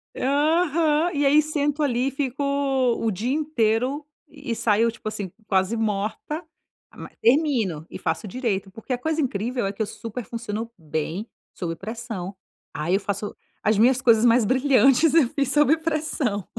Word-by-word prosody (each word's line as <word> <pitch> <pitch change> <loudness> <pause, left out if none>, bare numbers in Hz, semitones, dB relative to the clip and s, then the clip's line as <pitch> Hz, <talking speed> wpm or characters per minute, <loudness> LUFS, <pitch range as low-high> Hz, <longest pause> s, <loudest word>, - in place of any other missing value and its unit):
Aham, 310 +3 +2
e 290 0 +1
aí 290 +2 +6
sento 295 -1 -1
ali 255 -2 +1
e - - -1
fico 275 0 -3
o 270 -5 +1
dia 220 +7 -2
inteiro. 275 -1 0 0.2
E 285 -6 -5
saio, 225 +1 +2
tipo 225 -1 -10
assim, 200 -4 -4 0.2
quase 190 +3 +1
morta 220 - -2 0.5
mas - - -11
termino, 235 - +2
e - - -7
faço 165 +6 -2
direito 205 -3 -2
porque 225 +6 -10
a 250 - +1
coisa 315 +4 -1
incrível 240 -1 -1
é 195 - -1
que 205 - -7
eu - - +2
super 230 +2 -7
funciono 230 -1 -5
bem 160 +5 -4 0.3
sob 170 -3 -4
pressão, 215 -3 -6 0.4
ah 155 +4 -2
eu 195 - +3
faço 200 +1 -4 0.3
as 215 0 +2
minhas 250 +4 +4
coisas 230 -1 +5
mais 235 0 +5
brilhantes 270 +4 +4
eu 295 -8 +5
fiz 280 -2 -1
sob 295 +1 +4
pressão. 305 - -2
240 Hz, 165 wpm, -24 LUFS, 210-285 Hz, 0.5 s, aí